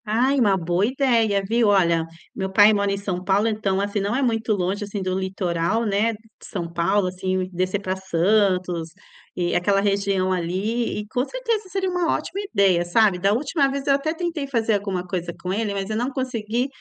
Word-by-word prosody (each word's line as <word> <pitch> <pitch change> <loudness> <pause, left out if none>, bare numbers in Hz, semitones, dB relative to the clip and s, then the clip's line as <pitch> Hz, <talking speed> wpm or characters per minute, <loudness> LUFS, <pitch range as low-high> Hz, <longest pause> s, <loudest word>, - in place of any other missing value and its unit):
Ai, 250 +6 +2
uma 205 -5 +3
boa 175 +1 0
ideia, 230 -6 +2
viu? 230 +1 +2
Olha, 170 -5 +3
o - - -10 0.3
meu 190 0 -2
pai 205 +2 +6
mora 200 -1 +1
em 200 - -1
São 190 -2 -4
Paulo, 200 +3 +2
então, 210 -3 0
assim, 205 +1 -1
não 200 +3 -1
é 270 - 0
muito 225 -2 +1
longe 195 +1 -1
assim 205 0 -5
do 185 0 -1
litoral, 190 +3 -1
né, 210 +2 +1
d - - -9
de 220 -1 -18
São 175 -4 -4
Paulo, 190 +4 +1
assim, 185 0 -2
descer 185 +3 -1
para 185 -1 -2
Santos 185 -2 +1 0.5
e 175 -1 -1
aquela 195 +3 +2
região 195 -2 +1
ali 190 +7 -1
e 210 - -6
com 250 +4 -1
certeza 455 - -3
seria 380 0 -1
uma 355 -2 0
ótima 400 - -3
ideia, 190 -5 +3
sabe, 195 +2 +3
da 195 +2 +2
última 275 +4 +1
vez 275 0 -4
eu 280 - +5
até 280 +3 0
tentei 335 -3 -3
fazer 230 -4 0
alguma 195 -3 -2
coisa 175 -1 -3
com 180 +1 -2
ele, 215 0 -1
mas 195 0 -3
eu 215 - -2
não 240 +4 -1
consegui, 245 -2 -2
200 Hz, 205 wpm, -23 LUFS, 185-230 Hz, 0.5 s, pai